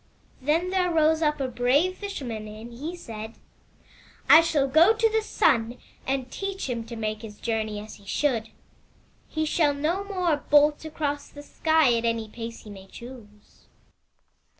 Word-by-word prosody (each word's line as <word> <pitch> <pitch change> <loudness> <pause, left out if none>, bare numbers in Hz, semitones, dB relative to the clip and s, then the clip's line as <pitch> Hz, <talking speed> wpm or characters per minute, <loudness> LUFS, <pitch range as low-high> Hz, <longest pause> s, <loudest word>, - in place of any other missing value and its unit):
* - - -35
"Then 325 +7 +1
there 370 -1 +1
rose 320 -1 +3
up 300 -2 +1
a 270 - -1
brave 260 +9 +2
Fisherman 255 - -5
and 220 +3 -10
he 305 +9 -6
said; 225 -8 -8 0.9
*I 320 - +9
shall 315 -4 +1
go 330 +10 +5
to 450 +1 +3
the 445 0 +2
Sun 235 - +1 0.3
and 265 -1 -2
teach 390 -3 -4
him 235 -3 -3
to 235 +1 -8
make 215 -1 -3
his 210 -2 -10
journey 220 -2 -2
as 215 +1 -10
he 200 - -20
should. 230 -3 0 0.8
He 315 0 -1
shall 300 -2 +2
no 330 +7 -1
more 365 -6 0
bolt 295 +1 +3
across 290 -2 -3
the 290 - -11
sky 315 -3 +3
at 230 0 -1
any 230 -1 0
pace 230 +1 -8
he 210 - -11
may 195 -1 -11
choose.' 220 -3 -14
275 Hz, 170 wpm, -26 LUFS, 230-320 Hz, 0.9 s, I